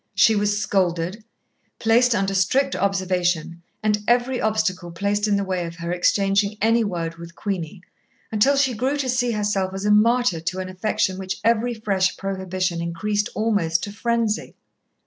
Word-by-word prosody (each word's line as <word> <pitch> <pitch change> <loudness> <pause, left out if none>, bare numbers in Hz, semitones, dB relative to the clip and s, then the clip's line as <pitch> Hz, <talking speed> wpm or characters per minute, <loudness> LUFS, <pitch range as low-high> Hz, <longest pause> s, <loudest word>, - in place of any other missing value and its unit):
She 225 - +5
was 205 0 +1
scolded, 185 0 -1 0.5
placed 235 +2 +3
under 195 -1 0
strict 260 +9 +2
observation, 180 -4 0 0.2
and 210 -1 +1
every 245 +2 +2
obstacle 185 -5 0
placed 200 +4 -1
in 205 - +2
the 200 - 0
way 185 -2 -2
of 165 - -8
her 170 +1 -5
exchanging 200 +3 +1
any 225 +3 +3
word 165 -5 -3
with 170 0 -11
Queenie, 185 -2 -4 0.5
until 230 +6 +3
she 270 -2 +2
grew 260 +6 -1
to 275 -2 -2
see 250 -1 +1
herself 200 -3 -1
as 195 +1 -4
a 210 - +3
martyr 230 -2 +3
to 165 +3 -3
an 185 0 -4
affection 185 0 -1
which 190 0 -4
every 235 +1 +2
fresh 195 -4 0
prohibition 185 -3 -2
increased 205 +5 -1
almost 205 -7 +1
to 205 - -4
frenzy. 230 0 -1
200 Hz, 165 wpm, -22 LUFS, 185-220 Hz, 0.5 s, She